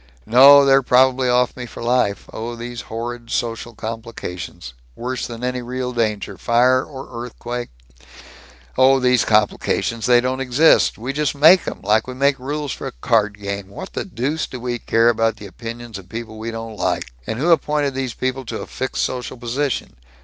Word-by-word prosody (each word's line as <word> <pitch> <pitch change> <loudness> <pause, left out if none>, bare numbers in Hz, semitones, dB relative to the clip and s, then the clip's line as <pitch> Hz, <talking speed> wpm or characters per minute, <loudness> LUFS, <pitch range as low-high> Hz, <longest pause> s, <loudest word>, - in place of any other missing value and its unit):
"No. 140 +4 +8
They're 135 0 +5
probably 130 0 +3
off 125 0 +2
me 125 -1 -7
for 115 - -9
life. 120 -4 +1
Oh, 115 +2 -5
these 120 +1 -6
horrible 120 +1 -5
social 115 0 -3
complications 110 - -7 0.2
worse 125 +1 -4
than 115 0 -8
any 125 0 -2
real 125 +1 -4
danger 105 -4 -2
fire 125 +2 +3
or 130 -4 -8
earthquake 120 0 -6 0.6
" 60 +1 -22
"Oh, 135 +1 +6
these 125 -1 +3
complications 110 +1 +1
they 120 -1 +6
don't 130 +1 -1
exist! 135 +5 +4
We 125 +5 -4
just 150 0 -1
make 160 +5 +6
'em, - - -5
like 105 +4 +2
we 125 - -6
make 140 +1 +2
rules 145 +2 -3
for - - -5
a - - -7
card 105 - +1
game. 100 -1 -5
What 190 - -9
the - - -2
deuce 150 -2 -2
do 125 - -8
we 120 0 -3
care 115 +1 +3
about 115 -1 +1
the 110 -2 -11
opinions 115 +1 -8
of 95 -1 -15
people 110 0 -7
we 115 +1 -4
don't 115 -1 -7
like? - - -1 0.2
And 110 - -3
who 160 +7 +2
appointed 150 -3 +2
these 130 -3 -3
people 130 +1 -2
to - - -5
a - - -6
fixed 130 0 -3
social 125 0 -4
position? 125 - -3
120 Hz, 185 wpm, -20 LUFS, 115-130 Hz, 0.6 s, No